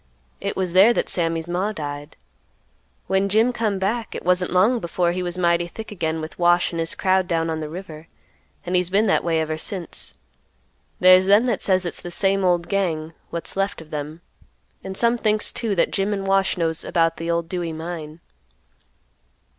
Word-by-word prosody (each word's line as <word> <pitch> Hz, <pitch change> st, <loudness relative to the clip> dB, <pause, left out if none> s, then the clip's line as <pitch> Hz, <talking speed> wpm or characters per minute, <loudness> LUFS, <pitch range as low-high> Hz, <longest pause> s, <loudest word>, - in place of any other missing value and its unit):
It 200 Hz, -, -3 dB
was 185 Hz, -2 st, -1 dB
there 195 Hz, +6 st, +7 dB
that -, -, -1 dB
Sammy's 165 Hz, -1 st, +1 dB
Ma 180 Hz, +4 st, -1 dB
died. 145 Hz, -5 st, -6 dB, 0.9 s
When 195 Hz, +1 st, +1 dB
Jim 225 Hz, +5 st, +3 dB
come 215 Hz, -4 st, -1 dB
back 215 Hz, +4 st, -2 dB
it -, -, -6 dB
wasn't 180 Hz, 0 st, +2 dB
long 205 Hz, +7 st, +3 dB
before 170 Hz, -2 st, 0 dB
he 180 Hz, +1 st, -3 dB
was 175 Hz, 0 st, -3 dB
mighty 170 Hz, -1 st, +2 dB
thick 220 Hz, +6 st, -9 dB
again 160 Hz, -5 st, -2 dB
with 155 Hz, +3 st, -8 dB
Wash 175 Hz, 0 st, +3 dB
and 165 Hz, -, -3 dB
his 165 Hz, 0 st, -1 dB
crowd 185 Hz, -1 st, +2 dB
down 165 Hz, -2 st, 0 dB
on 160 Hz, -, -3 dB
the 155 Hz, -1 st, -5 dB
river, 165 Hz, -2 st, -9 dB, 0.6 s
and 180 Hz, +1 st, -1 dB
he's 180 Hz, -1 st, +1 dB
been 200 Hz, +4 st, +3 dB
that 200 Hz, -, +2 dB
way 165 Hz, -1 st, +1 dB
ever 155 Hz, 0 st, -2 dB
since. 175 Hz, -, -5 dB, 0.8 s
There's 185 Hz, +1 st, +6 dB
them 205 Hz, +4 st, +5 dB
that 235 Hz, -5 st, 0 dB
says 185 Hz, -1 st, +2 dB
it's 175 Hz, -, -5 dB
the 175 Hz, -, -7 dB
same 195 Hz, +2 st, +1 dB
old 175 Hz, -2 st, +2 dB
gang, 165 Hz, -5 st, -1 dB, 0.2 s
what's 170 Hz, -, -3 dB
left 195 Hz, +1 st, -1 dB
of 160 Hz, -1 st, -13 dB
them, 150 Hz, +2 st, -5 dB, 0.6 s
and 190 Hz, 0 st, -6 dB
some 235 Hz, 0 st, +2 dB
thinks 215 Hz, -1 st, +1 dB
too 225 Hz, -4 st, -2 dB
that 170 Hz, -, +2 dB
Jim 200 Hz, +1 st, 0 dB
and 195 Hz, -1 st, -3 dB
Wash 195 Hz, -1 st, +2 dB
knows 165 Hz, -2 st, -1 dB
about 165 Hz, -1 st, +1 dB
the 165 Hz, 0 st, -4 dB
old 170 Hz, 0 st, 0 dB
Dewey 175 Hz, -2 st, -3 dB
mine." 160 Hz, -1 st, -7 dB
180 Hz, 195 wpm, -22 LUFS, 165-195 Hz, 0.9 s, there